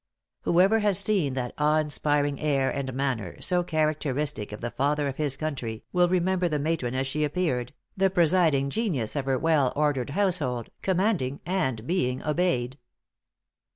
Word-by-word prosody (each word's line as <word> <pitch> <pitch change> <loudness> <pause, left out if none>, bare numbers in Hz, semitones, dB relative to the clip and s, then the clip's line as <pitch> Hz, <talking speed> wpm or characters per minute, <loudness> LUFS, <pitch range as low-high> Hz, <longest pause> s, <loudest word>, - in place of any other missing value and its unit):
Whoever 190 +6 +4
has 205 -3 +2
seen 190 -9 +1
that 125 -2 -3
awe 150 +1 +3
inspiring 145 -2 0
air 140 -3 +1
and 140 -2 -3
manner, 125 -8 -3
so 180 -1 +1
characteristic 150 -7 -1
of 105 - -7
the 120 0 -4
Father 145 +4 0
of 135 - -4
his 145 -3 0
country, 130 -8 -4
will 180 -1 +3
remember 185 0 +1
the 150 - 0
matron 145 -4 -1
as 130 +1 0
she 150 +3 -1
appeared, 145 -6 -1 0.2
the 195 0 +3
presiding 165 -6 +3
genius 155 - -1
of 140 -2 -2
her 135 -1 +1
well 150 -4 +2
ordered 145 -3 0
household, 145 - -1
commanding 185 - 0
and 130 - -1
being 130 -6 -1
obeyed." 145 -5 0
150 Hz, 155 wpm, -26 LUFS, 130-175 Hz, 0.2 s, Whoever